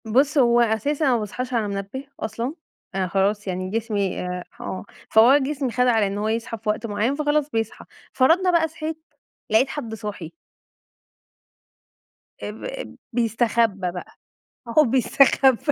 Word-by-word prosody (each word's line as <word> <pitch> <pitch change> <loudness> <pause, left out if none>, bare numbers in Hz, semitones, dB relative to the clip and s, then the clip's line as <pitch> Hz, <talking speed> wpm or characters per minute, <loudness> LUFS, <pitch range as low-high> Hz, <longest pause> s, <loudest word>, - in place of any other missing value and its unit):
بُصّ، 270 +7 +2
هو 240 -3 +5
أساسًا 235 +7 +1
أنا 265 - +4
ما 235 - +2
باصحاش 250 +5 -5
على 225 -3 +1
منبه 200 +7 -5
أصلًا، 235 +5 -3 0.4
أنا 190 -1 0
خلاص 200 +3 0
يعني 185 0 -3
جسمي 210 -3 -1
آآ، 180 0 -4 0.2
آه، 185 - -5 0.2
فهو 235 +6 +7
جسمي 275 -2 -2
خد 250 +1 +2
على 225 -4 +3
إن 195 +1 -4
هو 210 +1 -1
يصحى 230 +1 -2
في 215 0 -4
وقت 215 +2 -1
معيّن 220 +5 0
فخلاص، 300 0 +1
بيصحى 225 -4 -3 0.3
فرضنا 340 +8 +4
بقى 335 -2 +3
صحيت 315 0 -5 0.5
لقيت 220 +5 +4
حد 240 -6 -5
صاحي. 205 -7 -7 2.1
آآ، - - -3
ب - - -12
ب - - -6 0.2
بيستخبى 225 -4 +1
بقى، 180 0 -9 0.6
هو 310 - +9
بيستخبى 265 0 +4
230 Hz, 155 wpm, -23 LUFS, 205-270 Hz, 2.1 s, هو